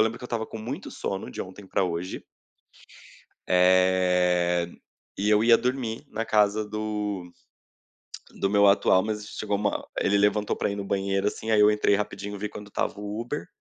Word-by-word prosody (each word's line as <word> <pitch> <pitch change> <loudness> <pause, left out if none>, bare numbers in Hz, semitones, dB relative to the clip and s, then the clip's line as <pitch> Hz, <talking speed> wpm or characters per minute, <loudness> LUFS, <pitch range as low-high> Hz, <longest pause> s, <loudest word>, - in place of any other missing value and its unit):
lembro 110 +2 -1
que - - -10
eu - - -4
estava 115 -2 -3
com - - -8
muito 130 - -6
sono 95 0 -4
de - - -5
ontem 95 +1 -12
pra 95 - +1
hoje 90 +1 -4 1.2
Eh, 90 -1 +3 0.5
e 105 +2 0
eu 105 +1 +4
ia 115 0 +6
dormir 125 -3 -2
na 115 +1 -3
casa 105 0 +2
do 105 -4 -3 1.1
do 100 - +1
meu 100 0 +5
atual, 100 -1 +4
mas 105 -1 -3
chegou 105 -1 -3
uma 105 +1 -2
ele 100 - +2
levantou 105 +1 +2
pra - - -1
ir 100 - -3
no 100 - -4
banheiro 100 +1 0
assim, 110 +1 -5
aí 110 -1 +4
eu 105 - +7
entrei 105 -1 +2
rapidinho 105 0 -3
e - - -6
vi 105 +2 -3
quanto 105 0 -10
estava 100 - -2
o 105 +1 -4
Uber. 120 +6 -4
105 Hz, 185 wpm, -26 LUFS, 95-110 Hz, 1.2 s, eu